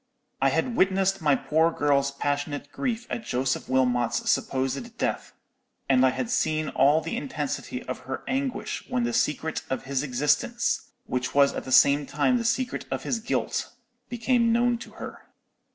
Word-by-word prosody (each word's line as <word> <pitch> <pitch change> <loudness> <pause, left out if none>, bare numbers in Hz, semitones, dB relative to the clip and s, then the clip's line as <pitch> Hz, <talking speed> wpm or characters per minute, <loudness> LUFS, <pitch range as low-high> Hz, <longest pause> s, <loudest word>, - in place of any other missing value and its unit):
I - - +5
had 245 - 0
witnessed 195 -1 +2
my 145 -3 +4
poor 160 +4 +2
girl's 140 -3 +2
passionate 145 +1 -3
grief 240 -2 -2
at 230 - -3
Joseph 130 -6 -1
Wilmot's 125 -2 +2
supposed 135 0 -2
death: - - -2 0.6
and 130 -1 +4
I 130 - +6
had 235 - -3
seen 155 - +1
all 145 +4 +4
the 160 - -4
intensity 140 -3 -4
of 130 - -5
her 130 +1 -6
anguish 265 0 -2
when 250 -1 0
the 235 0 -1
secret 160 -6 0
of 130 - -2
his 135 0 -1
existence, 150 - 0 0.2
which 125 - -3
was 140 -1 +5
at - - -5
the 130 - -6
same 140 +2 +5
time 150 - +2
the - - -2
secret 250 +2 -1
of - - -3
his 235 - -1
guilt, 225 - -2 0.4
became 235 0 +2
known 240 0 +2
to 240 - -11
her. - - -8
150 Hz, 170 wpm, -26 LUFS, -, 0.6 s, I